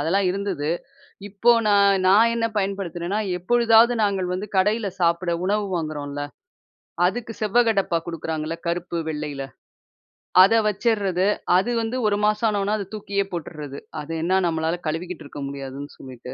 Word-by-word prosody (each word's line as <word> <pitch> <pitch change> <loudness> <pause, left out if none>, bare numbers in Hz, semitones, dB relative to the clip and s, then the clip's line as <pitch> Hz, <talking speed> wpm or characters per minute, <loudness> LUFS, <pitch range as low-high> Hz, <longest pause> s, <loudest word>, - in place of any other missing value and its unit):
அதெல்லாம் 185 +6 +1
இருந்தது. 185 -6 -2 0.6
இப்போ 210 +4 +3 0.2
நான் 200 -1 +4
நான் 220 +4 +5
என்ன 230 -1 0
பயன்படுத்துனேன்னா, 195 0 -2 0.2
எப்பொழுதாவது 235 +4 +4
நாங்க 195 -3 +1
வந்து 200 +3 -4
கடையில 210 +2 +2
சாப்பிட 170 0 +1
உணவு 205 +1 +1
வாங்குறோம்ல, 145 -3 -4 0.9
அதுக்கு 225 +3 -4
செவ்வகடப்பா 215 -5 +2
குடுக்குறாங்கல்ல 160 -1 -4
கருப்பு, 170 0 -2
வெள்ளையில 150 -3 -4 1.0
அத 200 +4 +5
வச்சிட்றது 200 -3 +1 0.3
அது 195 +6 +1
வந்து 225 +3 -2
ஒரு 205 - +2
மாசம் 215 +2 +2
ஆன 205 -1 0
உடனே 205 +2 0
அத 200 - -4
தூக்கியே 200 -1 -1
போட்றது. 150 -4 -6 0.2
அது 155 +2 -6
என்ன 185 +3 +2
நம்மளால 160 0 0
கழுவிகிட்டு 165 +2 -4
இருக்க 145 - -8
முடியாதுன்னு 140 0 -7
சொல்லிட்டு 125 -1 -10
190 Hz, 135 wpm, -23 LUFS, 160-210 Hz, 1.0 s, நான்